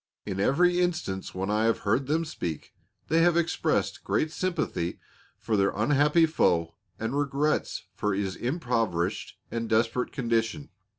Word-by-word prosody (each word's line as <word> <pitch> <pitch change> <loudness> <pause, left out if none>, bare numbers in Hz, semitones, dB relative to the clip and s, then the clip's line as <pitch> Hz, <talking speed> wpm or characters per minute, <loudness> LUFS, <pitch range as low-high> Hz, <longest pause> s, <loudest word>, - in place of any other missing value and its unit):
In 95 -2 -4
every 175 - +3
instance 165 - -2
when 95 +2 -2
I 110 +1 +2
have 115 - +1
heard 120 +6 +1
them 160 +3 +1
speak 85 - -5 0.3
they 165 +1 +3
have 170 0 +4
expressed 170 -1 0
great 155 - 0
sympathy 160 - -2 0.4
for 110 - -1
their 100 -1 +3
unhappy 145 - +4
foe 85 - +1 0.2
and 115 +4 -3
regrets 145 +1 0
for 105 -2 -1
his 95 -1 -2
impoverished 120 - -1
and 115 -1 -3
desperate 115 +3 +1
condition. 120 +2 -1
120 Hz, 140 wpm, -27 LUFS, 105-155 Hz, 0.4 s, have